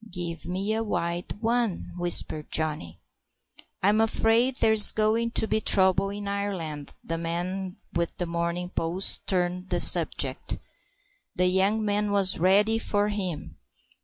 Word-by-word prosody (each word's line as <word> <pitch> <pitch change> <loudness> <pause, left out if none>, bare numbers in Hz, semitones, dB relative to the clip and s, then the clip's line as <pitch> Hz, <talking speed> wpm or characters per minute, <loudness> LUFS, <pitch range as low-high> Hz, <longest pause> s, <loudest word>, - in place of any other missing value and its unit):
"Give 170 -2 -5
me 195 +4 -2
a 220 - -1
wild 175 -2 -4
one" 230 -4 -1
whispered 175 -3 +1
Johnny. 150 - -3 0.8
"I'm 210 +3 +3
afraid 225 +3 +1
there's 220 -4 +6
going 220 +2 0
to 220 - +2
be 220 - -1
trouble 190 -1 +3
in 205 0 -7
Ireland," 185 -8 -5
the 165 0 -5
man 180 +3 -5 0.2
with 170 0 -3
The 175 - -3
Morning 170 +1 -3
Post 180 +3 0
turned 180 0 -2
the - - -1
subject. - - +3 0.8
The 180 - +1
young 195 +4 +1
man 205 0 -1
was 195 -3 +2
ready 205 +5 +3
for 205 -2 -1
him. 175 - -5
190 Hz, 135 wpm, -25 LUFS, 170-210 Hz, 0.8 s, there's